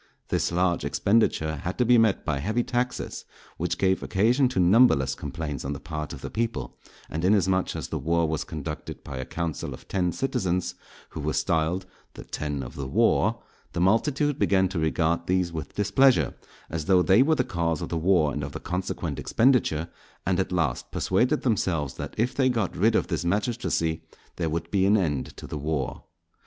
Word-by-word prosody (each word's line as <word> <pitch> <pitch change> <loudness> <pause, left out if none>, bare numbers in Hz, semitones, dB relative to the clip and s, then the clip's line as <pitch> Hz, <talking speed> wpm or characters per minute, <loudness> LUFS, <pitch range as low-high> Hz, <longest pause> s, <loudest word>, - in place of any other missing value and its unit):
This - - 0
large 90 0 +1
expenditure 90 -8 +1
had 90 +6 -4
to 125 - +2
be 120 0 +6
met 110 -3 +2
by 75 -3 -1
heavy 110 - 0
taxes 125 +1 -2 0.3
which 85 +1 -1
gave 95 0 +2
occasion 120 +7 +2
to 125 - -1
numberless 90 - +5
complaints 75 -2 -5
on 70 - -3
the 70 - -6
part 75 -2 -5
of - - -8
the - - -6
people; 115 0 -2 0.3
and 80 +2 -4
inasmuch 95 -1 +2
as - - -5
the - - -3
war 85 +3 +1
was 80 -1 -1
conducted 75 0 -6
by 70 - -7
a 65 - -4
council 85 0 -4
of - - -18
ten 90 -2 0
citizens, 90 -9 -1 0.4
who - - -8
were - - -1
styled 85 +3 0 0.3
"the - - -8
Ten 75 -2 -4
of - - -8
the 70 -2 -5
War," - - +2 0.3
the 85 - -2
multitude 130 - +2
began 95 -1 +3
to 95 -3 -3
regard 80 +1 0
these 90 -2 +1
with 80 -4 -6
displeasure, 110 +7 +3 0.3
as 80 -2 -4
though 95 -2 +4
they 95 +6 +5
were 160 +4 +4
the 125 - +1
cause 85 -6 -1
of - - -5
the - - -3
war 80 -3 +3
and - - -3
of - - -6
the - - -5
consequent 90 +1 -3
expenditure; 115 - +2 0.4
and 90 -1 +1
at 95 - -1
last 80 -8 -1
persuaded 125 +11 +1
themselves 85 - 0
that - - -7
if 120 +3 +1
they 130 -2 +2
got 115 -6 -1
rid 110 +4 +3
of - - +2
this - - -2
magistracy 90 -4 0 0.4
there 85 -2 -1
would 80 +1 -3
be 95 -1 +3
an 105 +2 +5
end 75 -9 -2
to - - -8
the 75 - -5
war. 75 -3 -3
90 Hz, 195 wpm, -26 LUFS, 80-110 Hz, 0.4 s, be